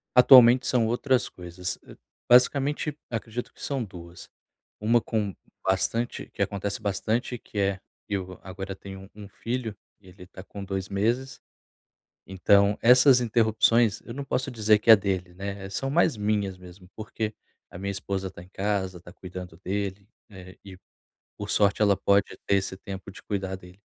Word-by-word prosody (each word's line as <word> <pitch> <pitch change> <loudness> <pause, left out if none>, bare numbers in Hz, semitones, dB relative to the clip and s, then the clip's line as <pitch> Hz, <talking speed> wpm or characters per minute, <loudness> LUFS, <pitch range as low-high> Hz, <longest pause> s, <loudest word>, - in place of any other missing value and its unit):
Atualmente 125 0 +8
são 125 -3 +2
outras 125 +2 +1
coisas, 90 0 -6
hã, - - -12 0.3
basicamente 140 +4 +3
acredito 115 +1 -5
que - - -18
são 135 -3 -2
2, 90 -4 -11 0.5
1 115 +3 +3
com 105 -5 -2 0.3
bastante 105 +5 -1
que - - -7
acontece 100 +1 -2
bastante, 110 +5 -1
que 105 - -7
é, 100 -1 0 0.3
eu 95 -3 -4
agora 95 +1 -7
tenho 95 0 -11
um 105 -1 -11
filho, 115 0 -4 0.3
e 95 - -20
ele 90 0 -13
tá 95 0 -12
com 100 +1 -9
2 95 -1 -4
meses, 115 +7 -1 0.9
então 100 +2 +3
essas 125 +2 +7
interrupções, 115 -1 +2
eu 115 - -9
não 140 +2 -5
posso 135 0 -2
dizer 110 -3 +3
que 110 - -3
é 110 - +12
dele, 95 -3 -3
né, 100 +1 -6
eh, - - -7
são 135 +7 -3
mais 160 -1 +3
minhas 105 -2 -1
mesmo, 90 0 -14
porque 110 0 -4 0.4
a - - -10
minha 100 +2 -3
esposa 95 0 -4
tá 85 - -12
em 90 - -14
casa, 95 -2 -2
tá 85 - -13
cuidando 90 -2 -9
dele, 100 0 -3 0.2
né, 95 -2 -12
e 95 -2 -11 0.6
por 105 0 -5
sorte 100 0 +2
ela 100 -2 +4
pode 100 0 +2
ter 100 - +3
esse 95 -1 -2
tempo 95 -1 -8
de 95 - -13
cuidar 95 -2 -3
dele. 90 +1 -16
100 Hz, 170 wpm, -26 LUFS, 95-115 Hz, 0.9 s, é